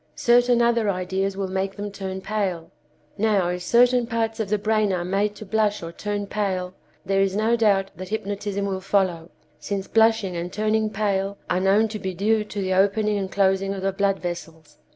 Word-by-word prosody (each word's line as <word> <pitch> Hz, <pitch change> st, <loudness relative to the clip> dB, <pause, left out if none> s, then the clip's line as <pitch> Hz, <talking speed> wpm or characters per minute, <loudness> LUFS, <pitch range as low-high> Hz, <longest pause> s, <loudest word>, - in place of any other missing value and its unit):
Certain 240 Hz, +5 st, +4 dB
other 235 Hz, -3 st, +2 dB
ideas 190 Hz, +1 st, -1 dB
will 195 Hz, -1 st, -2 dB
make 190 Hz, +1 st, -2 dB
them 205 Hz, 0 st, -5 dB
turn 190 Hz, -1 st, -5 dB
pale. 190 Hz, -6 st, -3 dB, 0.5 s
Now, 205 Hz, -4 st, +2 dB
if 180 Hz, 0 st, -3 dB
certain 240 Hz, +5 st, +3 dB
parts 225 Hz, -1 st, -2 dB
of 215 Hz, -3 st, -2 dB
the 210 Hz, -, +2 dB
brain 215 Hz, 0 st, +1 dB
are 175 Hz, -2 st, -1 dB
made 200 Hz, +3 st, 0 dB
to 215 Hz, -, -9 dB
blush 210 Hz, -1 st, 0 dB
or 165 Hz, -, -6 dB
turn 205 Hz, +3 st, -3 dB
pale, 190 Hz, -3 st, -2 dB, 0.3 s
there 195 Hz, 0 st, +2 dB
is 195 Hz, 0 st, +1 dB
no 220 Hz, +3 st, +2 dB
doubt 200 Hz, -4 st, +2 dB
that 185 Hz, +1 st, -7 dB
hypnotism 200 Hz, -1 st, -3 dB
will 190 Hz, -1 st, -3 dB
follow, 185 Hz, -4 st, 0 dB, 0.3 s
since 195 Hz, +4 st, -3 dB
blushing 220 Hz, -4 st, +3 dB
and 170 Hz, +1 st, -4 dB
turning 215 Hz, +1 st, 0 dB
pale 200 Hz, -1 st, -1 dB
are 180 Hz, -, +2 dB
known 195 Hz, +4 st, +3 dB
to 215 Hz, 0 st, -5 dB
be 190 Hz, -1 st, -4 dB
due 215 Hz, +4 st, +2 dB
to 210 Hz, -1 st, -5 dB
the 190 Hz, -1 st, 0 dB
opening 205 Hz, +2 st, +2 dB
and 190 Hz, -1 st, -4 dB
closing 195 Hz, 0 st, +1 dB
of 190 Hz, -, -6 dB
the 195 Hz, -, +1 dB
blood 195 Hz, 0 st, +1 dB
vessels. 165 Hz, -3 st, -7 dB
200 Hz, 195 wpm, -24 LUFS, 190-215 Hz, 0.5 s, Certain